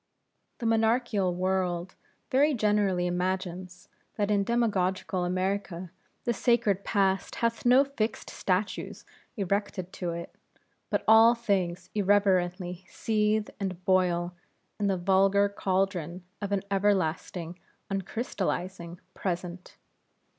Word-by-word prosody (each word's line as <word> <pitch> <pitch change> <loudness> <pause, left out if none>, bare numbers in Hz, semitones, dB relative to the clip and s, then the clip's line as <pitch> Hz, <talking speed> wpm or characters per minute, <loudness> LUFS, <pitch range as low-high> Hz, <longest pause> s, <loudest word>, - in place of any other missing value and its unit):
The 235 - -5
monarchical 225 -3 +2
world 185 -1 -1 0.4
very 285 +3 +4
generally 205 -5 +2
imagines, 180 +1 -3 0.3
that 205 -1 0
in 200 -1 +3
demagoguical 190 -5 0
America 185 -1 -2 0.3
the 240 - +1
sacred 215 -4 +2
Past 195 -3 +1
hath 230 +1 0
no 255 +3 +7
fixed 230 -6 -3
statues 190 +2 -2 0.3
erected 195 -2 -2
to 180 - -3
it, 170 0 -6 0.6
but - - 0
all 225 +2 +7
things 195 -7 -1
irreverently 185 -3 +1
seethe 215 -1 0
and 185 -2 -4
boil 180 -2 +2 0.5
in 205 - +1
the 195 -1 +1
vulgar 195 +2 +3
caldron 190 -3 -1 0.2
of 205 -1 -3
an 200 -2 0
everlasting 180 -3 0 0.3
uncrystalizing 185 -4 -3 0.2
Present. 180 -1 -5
195 Hz, 105 wpm, -28 LUFS, 180-210 Hz, 0.6 s, no